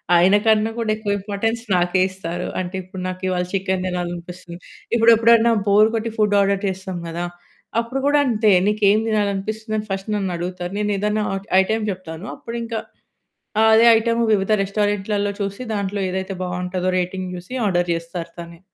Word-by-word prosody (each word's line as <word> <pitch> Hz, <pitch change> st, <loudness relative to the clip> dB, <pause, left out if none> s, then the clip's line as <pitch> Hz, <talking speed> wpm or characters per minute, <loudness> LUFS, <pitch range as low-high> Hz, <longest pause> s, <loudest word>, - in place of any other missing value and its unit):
ఆయన 185 Hz, +4 st, +5 dB
కన్నా 220 Hz, 0 st, +3 dB
గూడా 225 Hz, -2 st, 0 dB
ఎక్కువ 215 Hz, -2 st, -3 dB
ఇంపార్టెన్స్ 225 Hz, +3 st, -2 dB
నాకే 180 Hz, +1 st, +2 dB
ఇస్తారు. 180 Hz, -1 st, -5 dB
అంటే 185 Hz, +1 st, -4 dB
ఇప్పుడు 185 Hz, 0 st, -9 dB
నాకివాళ 185 Hz, -1 st, -2 dB
చికెన్ 190 Hz, -1 st, -1 dB
తినాలనిపిస్తుంది. 175 Hz, 0 st, -5 dB, 0.4 s
ఇప్పుడెప్పుడైనా 230 Hz, 0 st, +5 dB, 0.2 s
బోర్ 210 Hz, +2 st, +5 dB
కొట్టి 225 Hz, 0 st, -2 dB
ఫుడ్ 210 Hz, -1 st, +2 dB
ఆర్డర్ 200 Hz, 0 st, +1 dB
చేస్తాం 190 Hz, -1 st, -4 dB
గదా! 170 Hz, +1 st, -3 dB, 0.5 s
అప్పుడు 235 Hz, +3 st, -2 dB
గూడా 290 Hz, 0 st, +4 dB
అంతే. 220 Hz, -2 st, +3 dB, 0.2 s
నీకేం 210 Hz, 0 st, +3 dB
తినాలనిపిస్తుందని 215 Hz, +1 st, -1 dB
ఫస్ట్ 195 Hz, +2 st, -4 dB
నన్నడుగుతారు. 180 Hz, -2 st, -3 dB
నేనేదన్నా 210 Hz, +1 st, 0 dB, 0.4 s
ఐటెమ్ 220 Hz, +3 st, -1 dB
చెప్తాను. 180 Hz, 0 st, -8 dB
అప్పుడు 235 Hz, 0 st, -7 dB
ఇంకా 230 Hz, -1 st, -3 dB, 0.9 s
అదే 225 Hz, +1 st, +6 dB
ఐటెమ్ 230 Hz, +1 st, 0 dB
వివిధ 195 Hz, 0 st, +1 dB
రెస్టారెంట్లలో 205 Hz, 0 st, -1 dB
చూసి 200 Hz, +3 st, -3 dB
దాంట్లో 200 Hz, 0 st, -2 dB
ఏదైతే 190 Hz, +1 st, -3 dB
బావుంటదో 180 Hz, 0 st, -2 dB
రేటింగ్ 185 Hz, +1 st, -3 dB
జూసి 180 Hz, +7 st, -9 dB
ఆర్డర్ 175 Hz, -2 st, +1 dB
జేస్తరు 170 Hz, 0 st, -5 dB
తనే. 170 Hz, 0 st, -9 dB
195 Hz, 140 wpm, -21 LUFS, 180-215 Hz, 0.9 s, అదే